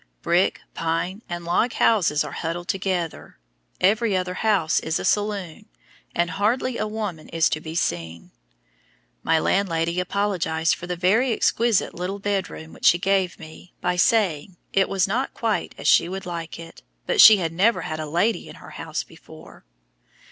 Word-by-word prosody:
Brick, 175 +2 +1
pine, 165 +5 -2
and 175 -1 -5
log 200 +8 +1
houses 175 -10 +2
are 150 - -7
huddled 170 +3 -4
together, 185 - -3 0.4
every 210 +1 +2
other 180 0 -2
house 190 -6 +1
is 160 +1 -2
a - - -4
saloon, 205 -2 -1 0.5
and 175 +1 +1
hardly 230 +7 0
a 215 - -1
woman 210 -7 -5
is 165 -1 +2
to 155 - -2
be 160 0 -7
seen. 85 - -3 0.9
My 160 - +2
landlady 170 -1 0
apologized 180 -4 0
for 175 - -7
the 180 - -2
very 210 +9 +2
exquisite 230 -1 +1
little 185 +3 -4
bedroom 195 -5 -4
which - - -8
she 175 - +6
gave 190 0 0
me 160 +2 -13
by 180 0 -1
saying 180 -3 +1 0.2
"it 195 -1 +2
was 195 -1 +1
not 245 +7 -2
quite 225 -3 -2
as - - -4
she 170 - +5
would 190 +1 -6
like 170 -2 -6
it, 165 0 -12 0.2
but - - +4
she 215 -1 +10
had 165 -3 -2
never 190 +3 +2
had 155 -2 -5
a 155 - -4
lady 175 +5 0
in - - -11
her - - -13
house - - -5
before." - - -16
180 Hz, 170 wpm, -23 LUFS, 165-205 Hz, 0.9 s, she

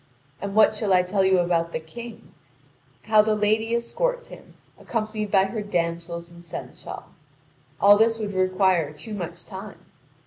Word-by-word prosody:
And 200 +1 -4
what 215 0 +6
shall 210 -2 0
I 180 -1 +5
tell 190 +2 +1
you 190 0 +4
about 170 -1 +1
the - - -1
King 230 +9 -11 0.7
how 215 -1 +5
the 215 0 +1
lady 220 +2 +1
escorts - - -2
him, - - -14 0.2
accompanied 215 -2 -3
by 195 -2 +4
her 215 +3 -3
damsels 170 -3 -3
and 170 0 -14
seneschal? 170 - -8 0.8
All 205 +1 +7
this 225 0 +3
would 210 -2 -4
require 185 -4 +2
too 155 +9 -8
much 180 -5 -6
time. - - -9
200 Hz, 160 wpm, -24 LUFS, 175-220 Hz, 0.8 s, All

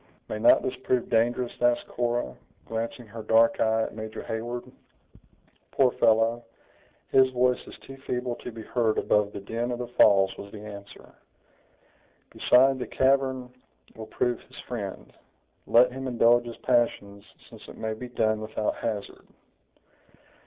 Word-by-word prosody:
"May 105 - -4
not - - +5
this 130 - -2
prove 125 -1 -1
dangerous?" 120 +2 +1
asked 120 0 +2
Cora, 120 - -2 0.3
glancing 115 +2 -4
her 110 +1 -9
dark 115 +1 +3
eye 110 0 +2
at - - -5
Major 110 0 -7
Heyward. 120 +2 -4 1.1
"Poor 130 -2 +3
fellow! 115 +1 +2 0.7
his 130 0 +5
voice 125 0 +1
is - - -11
too 135 - -11
feeble 125 -2 -3
to 125 - -8
be 110 -1 -9
heard 115 -1 0
above 105 -1 +2
the - - -7
din 115 +4 -3
of 120 - -2
the 125 - -4
falls," 100 -5 +4
was 100 - -9
the 105 -1 -10
answer; 100 -1 -11 1.2
"beside, 130 +1 +4
the - - -4
cavern 130 -1 +1 0.4
will 110 -1 -8
prove 120 +1 -1
his 130 - -18
friend. 105 -6 -6 0.5
Let 125 +2 +5
him 135 +1 -6
indulge 120 0 +3
his 120 -1 -8
passions 110 -5 0 0.2
since - - -14
it - - -12
may 110 0 -3
be 125 +3 -8
done 110 -2 0
without 110 0 -3
hazard." 105 -3 -5
120 Hz, 150 wpm, -26 LUFS, 110-125 Hz, 1.2 s, not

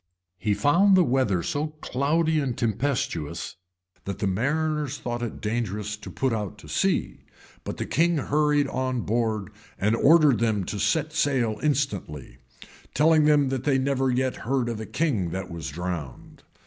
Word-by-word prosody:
He 100 +3 0
found 180 - +4
the 180 - +6
weather 120 - +1
so 145 +2 -1
cloudy 155 +5 +1
and 135 -5 -2
tempestuous, 105 - -2 0.5
that 100 - -4
the - - -2
mariners 145 +8 -1
thought 120 0 -4
it 120 -2 -4
dangerous 105 -1 -2
to - - -10
put 110 -7 -2
to - - -14
sea: - - -1 0.4
but - - -5
the - - -3
king 170 +2 +2
hurried 145 0 +2
on 130 -2 -2
board, 110 -3 -1 0.3
and 105 +3 +1
ordered 150 -1 +5
them 110 -4 +1
to 100 +3 -5
set 155 - 0
sail 130 -8 +1
instantly; 125 - -2 0.6
telling 155 +1 +4
them 145 -3 +4
that 135 -1 -2
they 140 -2 +2
never 135 0 +1
yet 130 +1 0
heard 125 0 -1
of 115 -2 -4
a 110 - -6
king 125 - 0
that 95 +2 -5
was 85 -5 -5
drowned. 85 -4 -6
125 Hz, 160 wpm, -25 LUFS, 105-145 Hz, 0.6 s, the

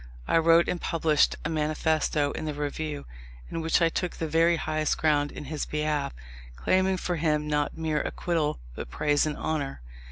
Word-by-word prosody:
I 165 - +4
wrote 165 +1 +5
and 175 - -2
published 155 -2 +2
a - - 0
manifesto 155 -1 +1
in - - -5
the 150 -1 -3
Review, 150 0 -3 0.5
in 165 - -2
which 165 +2 +2
I 165 - +5
took 180 +2 -2
the 160 - -3
very 165 +2 +4
highest 155 -1 -1
ground 145 -2 +2
in - - -8
his 150 +1 -3
behalf, 150 -1 -1 0.4
claiming 185 - +2
for 175 -1 -2
him 150 -1 +1
not 150 0 0
mere 155 -2 0
acquittal, 165 -4 -1 0.2
but - - -7
praise 145 - +1
and 150 - -3
honour. 140 - -2
155 Hz, 180 wpm, -27 LUFS, 150-165 Hz, 0.5 s, wrote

